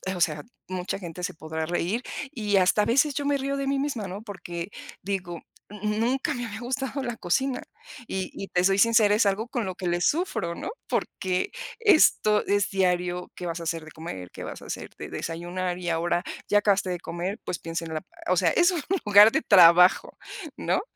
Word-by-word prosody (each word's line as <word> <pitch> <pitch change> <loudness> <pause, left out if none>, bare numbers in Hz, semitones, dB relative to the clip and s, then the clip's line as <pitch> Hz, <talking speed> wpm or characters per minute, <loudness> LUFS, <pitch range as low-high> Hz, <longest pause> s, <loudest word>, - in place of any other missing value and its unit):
o 180 - -5
sea, 150 -3 +1 0.2
mucha 185 +1 -3
gente 180 -1 -8
se - - -2
podrá 160 0 -4
reír 175 +8 -1 0.3
y 210 -4 0
hasta 190 +3 +4
a - - 0
veces 275 +5 +3
yo 285 - -2
me 285 0 +2
río 275 +1 -2
de 275 - -2
mí 275 0 +1
misma, 270 -8 -2
¿no?, 190 +3 -6
porque 180 -4 -7 0.3
digo, 185 -3 -4 0.3
n 210 -1 -10
n 210 +1 0
nunca 265 +6 0
me 245 -2 -4
había 220 +2 -7
gustado 265 +2 -3
la 240 -2 -3
cocina 260 +9 0 0.5
y 190 -1 -3
y 195 - -6
te 180 - +1
soy 195 +1 +3
sincera, 225 -2 +5
es 220 - +3
algo 210 +4 0
con 240 -3 -2
lo 185 - -4
que 185 - -7
le 175 0 0
sufro, 175 - 0
¿no?, - - -5 0.2
porque 185 -1 -1 0.3
esto 310 - +4
es 205 -1 +2
diario, 180 -2 0
¿qué 180 - -7
vas 170 0 -3
a - - -6
hacer 165 0 -3
de 155 - -12
comer? 95 - -8
¿Qué - - -8
vas - - -7
a - - -11
hacer - - -6
de - - -7
desayunar? 175 +2 -4
Y 175 -1 -3
ahora 170 +2 0 0.2
ya 205 - +4
acabaste 200 -2 +2
de 180 -1 -2
comer, 180 +5 -4
pues, 175 - -4
piensa 165 0 -4
en 160 - -6
la 155 - -2 0.3
o 185 - +3
sea, - - +4
es 350 +1 +4
un 345 -4 -2 0.2
lugar 205 +1 +8
de 315 - +1
trabajo, 180 -2 +6 0.4
¿no?, - - 0
190 Hz, 215 wpm, -26 LUFS, 175-230 Hz, 0.5 s, lugar